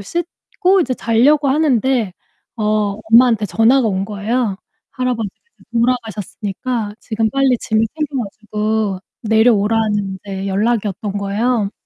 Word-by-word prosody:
씻고 345 - -1
이제 255 -6 0
잘려고 275 +6 +3
하는데 260 - +2 0.4
어 210 -2 0 0.2
엄마한테 230 -2 +6
전화가 235 +5 +3
온 190 -2 0
거예요. 210 +1 -1 0.3
할아버지께서 250 - -3 0.3
돌아가셨으니까 225 -1 -2
지금 220 -1 -1
빨리 270 -1 +2
짐을 220 0 +1
챙겨 295 -4 -2
가지고 215 0 -2 0.2
내려오라는 220 -1 +3 0.3
인제 195 -1 -5
연락이었던 205 0 -1
거예요. 205 +2 0
225 Hz, 310 characters per minute, -18 LUFS, 205-250 Hz, 0.4 s, 엄마한테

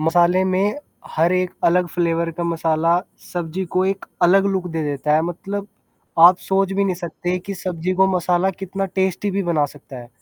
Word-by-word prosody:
मसाले 175 +3 +3
में 190 +2 +1 0.4
हर 165 +3 +3
एक 185 0 +1
अलग 180 +1 +3
फ्लेवर 170 0 0
का 170 - -1
मसाला 165 0 +1 0.3
सब्ज़ी 175 +1 -3
को 185 +1 +3
एक 195 0 -2 0.2
अलग 195 +3 +5
लुक 190 -2 -2
दे 160 -1 -2
देता 150 +1 0
है, 155 - +3
मतलब 195 +4 -5 0.5
आप 175 +2 +8
सोच 195 0 0
भी 200 +1 +1
नहीं 190 -2 0
सकते 175 +1 -3
कि 200 - -4
सब्जी 180 -1 -3
को 190 +1 +4
मसाला 180 +1 +1
कितना 195 +1 -4
टेस्टी 190 +1 0
भी 195 +1 -1
बना 165 -4 +1
सकता 135 -1 -13
है। 120 -1 -11
180 Hz, 190 wpm, -21 LUFS, 165-190 Hz, 0.5 s, आप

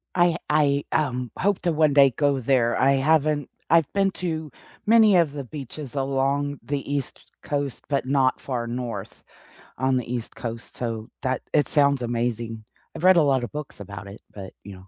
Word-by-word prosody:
I 175 -2 +3
I, 145 -2 +3
um, 125 -5 -1
hope 200 0 +1
to 175 - +1
one 155 -2 +3
day 140 -1 +6
go 145 -2 +2
there, 120 -2 +2
I 135 +1 +4
haven't 150 0 +2 0.2
I've 165 -2 +4
been 195 -1 +2
to 160 -5 -4 0.3
many 220 -3 +6
of 165 -5 +2
the 145 -1 -5
beaches 140 +1 -8
along 140 +1 0
the 140 -1 -4
East 140 -2 -3 0.2
Coast, 145 -4 -3
but 140 -3 0
not 130 -1 +2
far 125 -3 -3
north 120 0 -5 0.5
on 130 +1 +1
the 120 -1 -4
East 120 -2 -5
Coast, 115 -1 -7
so 115 -2 -4
that 130 -2 -1
it 145 -4 +3
sounds 140 -3 +3
amazing. 115 -2 -3 0.3
I've - - -7
read 185 0 +8
a - - +6
lotta 135 -4 +2
books 150 +1 -8
about 100 0 -8
it, 100 +2 -10
but, 95 -2 -8
you 100 - -8
know, 95 +1 -15
140 Hz, 180 wpm, -24 LUFS, 120-150 Hz, 0.5 s, read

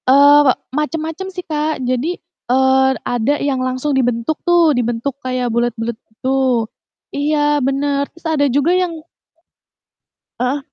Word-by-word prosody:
Eee, 285 +2 +7
we - - +7 0.2
macam-macam 320 +4 -3
sih, 365 -1 -7
Kak. 310 0 -1
Jadi, 255 +8 -1 0.3
eee, 265 +1 +4 0.2
ada 245 +3 0
yang 275 -3 -1
langsung 255 +3 -1
dibentuk 245 +3 0
tuh, 345 -3 +4
dibentuk 240 +2 -1
kayak 255 -2 -2
bulat-bulat 235 -1 -1
gitu 255 0 0 0.5
iya 295 0 +1
bener, 280 +1 0
terus 335 - -22
ada 310 -3 +1
juga 285 +5 +2
yang 355 -3 -1 1.4
Heeh. 250 +4 0
280 Hz, 130 wpm, -18 LUFS, 255-305 Hz, 1.4 s, Eee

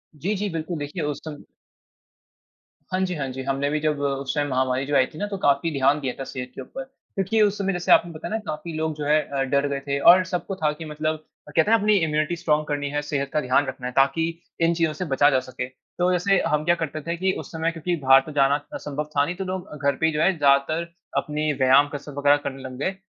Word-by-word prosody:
जी, 190 +8 -2
जी 205 +1 -2
बिल्कुल 165 0 -4
देखिए 150 +3 -4
उस 150 -1 -2
सम 150 -2 -8 1.5
हाँ 185 - +1
जी, 180 -1 -3
हाँ 140 -3 -3
जी। 130 +1 -6
हमने 140 +1 -1
भी 155 +1 0
जब 150 -1 0
उस 140 -1 -1
टाइम 145 -1 0
महामारी 130 +1 0
जो 145 0 -1
आयी 130 - +5
थी 155 - -14
ना 205 - -2
तो 200 - -2
काफ़ी 145 +1 +2
ध्यान 140 +1 +2
दिया 130 -3 -3
था - - -3
सेहत 125 -1 -6
के - - -6
ऊपर। 270 - -7 0.3
क्योंकि 195 +3 +1
उस 205 -1 +3
समय 195 -1 -1
जैसे 175 0 -1
आपने 170 - +5
बताया 160 +7 -6
ना - - +1
काफ़ी 155 +2 -5
लोग 160 0 -1
जो 150 - -4
है 150 +1 +4
अ, 140 -2 -3
डर 140 +1 +1
गए 140 -1 -2
थे 140 0 0
और 180 +5 +7
सबको 185 +1 -3
था 155 -4 +1
कि 155 +2 -8
मतलब 155 +1 -2 0.3
अ, - - -11
कहते 185 +7 +3
है 225 - +7
अपनी 210 0 +3
इम्यूनिटी 155 -1 +1
स्ट्रांग 155 -3 +1
करनी 145 -1 -2
है, 145 +1 -1
सेहत 140 -2 -2
का 150 - +2
ध्यान 130 +3 +2
रखना 125 - -5
है 125 - -6
ताकि 135 +4 +3 0.4
इन 165 +1 +4
चीज़ों 165 -2 0
से 180 +5 -4
बचा 145 +2 +5
जा 130 - +3
सके। 130 0 -6
तो 175 +7 -3
जैसे 185 +2 +2
हम 150 0 +1
क्या 175 - +4
करते 155 -2 -4
थे 170 - -1
कि 190 +2 +1
उस - - -9
समय 165 0 -1
क्योंकि 170 +2 -2
बाहर 135 0 +8
तो 155 - -8
जाना 140 -1 +3 0.2
अ, - - -3
संभव 150 +1 -5
था 140 - +5
नहीं 180 +4 -4
तो 190 - -4
लोग 185 -4 -5
घर 140 - +3
पे 160 - 0
ही 160 - +3
जो 150 - 0
है 190 -3 +3
ज़्यादातर 145 +4 +2 0.3
अपनी 150 0 0
व्यायाम, 135 +1 +5
कसरत 145 0 -7
वग़ैरह 145 0 +4
करने 135 0 -6
लग 130 -1 -7
गए। 190 +5 -1
150 Hz, 260 wpm, -24 LUFS, 140-170 Hz, 1.5 s, बाहर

